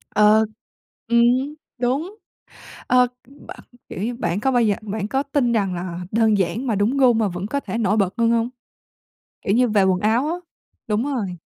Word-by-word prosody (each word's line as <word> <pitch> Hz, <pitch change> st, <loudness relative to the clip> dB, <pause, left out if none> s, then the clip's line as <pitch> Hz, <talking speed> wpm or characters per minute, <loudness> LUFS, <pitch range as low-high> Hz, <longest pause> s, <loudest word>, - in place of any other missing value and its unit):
Ờ, 215 Hz, +1 st, +5 dB, 0.6 s
ừm, 235 Hz, 0 st, +4 dB, 0.6 s
đúng. 275 Hz, -, -1 dB, 0.7 s
Ờ, 250 Hz, 0 st, +4 dB, 0.2 s
b 275 Hz, +2 st, -18 dB, 0.4 s
kiểu -, -, -6 dB
như, 240 Hz, +3 st, -2 dB
bạn 175 Hz, -4 st, -2 dB
có 265 Hz, -, +1 dB
bao 245 Hz, -2 st, +3 dB
giờ 210 Hz, -3 st, +2 dB
bạn 210 Hz, -1 st, -4 dB
có 270 Hz, +5 st, 0 dB
tin 280 Hz, -4 st, 0 dB
rằng 200 Hz, -5 st, 0 dB
là 175 Hz, 0 st, -5 dB
đơn 220 Hz, -1 st, +3 dB
giản 195 Hz, +7 st, -1 dB
mà 225 Hz, -, +1 dB
đúng 210 Hz, +7 st, +1 dB
gu 255 Hz, -3 st, +5 dB
mà 220 Hz, -2 st, +1 dB
vẫn 185 Hz, +2 st, -5 dB
có 280 Hz, -, -1 dB
thể 230 Hz, -, -5 dB
nổi 215 Hz, -1 st, +1 dB
bật 195 Hz, -2 st, +1 dB
hơn 230 Hz, -1 st, +3 dB
hông? 230 Hz, 0 st, +1 dB, 0.9 s
Kiểu 195 Hz, -, 0 dB
như 250 Hz, +2 st, +3 dB
về 210 Hz, -3 st, +3 dB
quần 190 Hz, -1 st, +2 dB
áo 225 Hz, +7 st, +1 dB
á. 320 Hz, -, -1 dB, 0.5 s
Đúng 215 Hz, +2 st, 0 dB
rồi. 195 Hz, -7 st, -3 dB
220 Hz, 195 wpm, -21 LUFS, 200-245 Hz, 0.9 s, Ờ